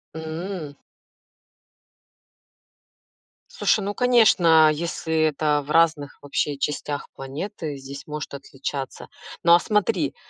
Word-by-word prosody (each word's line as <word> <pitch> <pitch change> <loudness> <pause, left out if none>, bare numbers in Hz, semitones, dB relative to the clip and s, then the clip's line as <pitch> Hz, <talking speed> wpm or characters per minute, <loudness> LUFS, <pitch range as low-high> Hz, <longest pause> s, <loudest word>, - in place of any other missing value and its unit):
М. 160 -1 -6 2.7
Слушай, 215 - +1
ну 200 +1 -3
конечно, 180 -11 +5
если 165 0 -4
это 150 -1 +1
в 150 - -7
разных 160 -3 +2
вообще 145 0 -2
частях 145 0 -3
планеты, 145 +2 -6
здесь 135 +1 -10
может 150 -1 -6
отличаться. 135 0 -6 0.4
Но, 170 0 +6
а - - +5
смотри, 190 -9 0
155 Hz, 100 wpm, -23 LUFS, 145-170 Hz, 2.7 s, Но